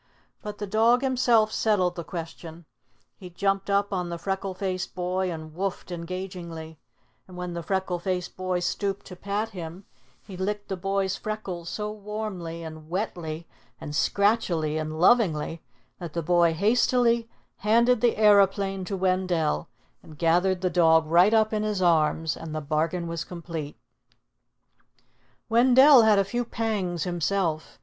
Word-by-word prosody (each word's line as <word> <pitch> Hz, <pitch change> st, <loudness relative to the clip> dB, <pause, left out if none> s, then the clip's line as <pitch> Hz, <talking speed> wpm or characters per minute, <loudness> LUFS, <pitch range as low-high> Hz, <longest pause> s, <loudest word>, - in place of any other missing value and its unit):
But 210 Hz, 0 st, -7 dB
the 205 Hz, -, -4 dB
dog 225 Hz, +5 st, +3 dB
himself 245 Hz, -4 st, +3 dB
settled 195 Hz, -6 st, +1 dB
the 170 Hz, -, -5 dB
question. 165 Hz, 0 st, -8 dB, 0.5 s
He 185 Hz, -, -10 dB
jumped 195 Hz, +2 st, -1 dB
up 200 Hz, 0 st, +1 dB
on 180 Hz, -2 st, -2 dB
the 170 Hz, -, -4 dB
freckle 195 Hz, +1 st, -3 dB
faced 185 Hz, -1 st, -3 dB
boy 185 Hz, +1 st, -1 dB
and 155 Hz, -1 st, -8 dB
"woof" 190 Hz, +3 st, -3 dB
ed -, -, -12 dB
engagingly; 170 Hz, -2 st, -7 dB, 0.5 s
and 180 Hz, -1 st, -12 dB
when 180 Hz, -1 st, -5 dB
the 170 Hz, -, -4 dB
freckle 190 Hz, 0 st, -2 dB
faced 180 Hz, 0 st, -3 dB
boy 185 Hz, -1 st, -2 dB
stooped 195 Hz, +2 st, -2 dB
to 185 Hz, -, -9 dB
pat 200 Hz, +4 st, -3 dB
him, 180 Hz, -1 st, -8 dB, 0.4 s
he 195 Hz, -, -9 dB
licked 205 Hz, +3 st, -3 dB
the 190 Hz, -, -1 dB
boy's 195 Hz, +1 st, -1 dB
freckles 190 Hz, -6 st, -5 dB
so 210 Hz, +2 st, -4 dB
warmly 205 Hz, -6 st, -6 dB
and 155 Hz, -1 st, -9 dB
wetly 170 Hz, -4 st, -4 dB, 0.3 s
and 150 Hz, -, -7 dB
scratchily 185 Hz, -6 st, +1 dB
and 155 Hz, 0 st, -4 dB
lovingly 170 Hz, -6 st, +3 dB, 0.4 s
that 170 Hz, -4 st, -7 dB
the 170 Hz, -, -2 dB
boy 170 Hz, 0 st, +3 dB
hastily 235 Hz, +3 st, +2 dB, 0.3 s
handed 235 Hz, +3 st, +3 dB
the 240 Hz, -2 st, +2 dB
aeroplane 200 Hz, -2 st, +3 dB
to 195 Hz, +1 st, -3 dB
Wendell 185 Hz, -, 0 dB, 0.3 s
and 155 Hz, -, -14 dB
gathered 180 Hz, +3 st, +2 dB
the 185 Hz, -1 st, 0 dB
dog 160 Hz, -2 st, +4 dB
right 175 Hz, +6 st, +5 dB
up 220 Hz, -1 st, +3 dB
in 215 Hz, -, 0 dB
his 210 Hz, -2 st, -1 dB
arms; 160 Hz, -2 st, +2 dB
and 160 Hz, -1 st, -7 dB
the -, -, -1 dB
bargain 155 Hz, +4 st, -1 dB
was 165 Hz, -1 st, -3 dB
complete. 165 Hz, -4 st, -7 dB, 1.7 s
Wendell 255 Hz, +3 st, +7 dB
had 220 Hz, -2 st, +5 dB
a 195 Hz, -, +4 dB
few 240 Hz, +5 st, -2 dB
pangs 205 Hz, -8 st, -2 dB
himself. 175 Hz, -2 st, -1 dB
185 Hz, 155 wpm, -26 LUFS, 170-210 Hz, 1.7 s, Wendell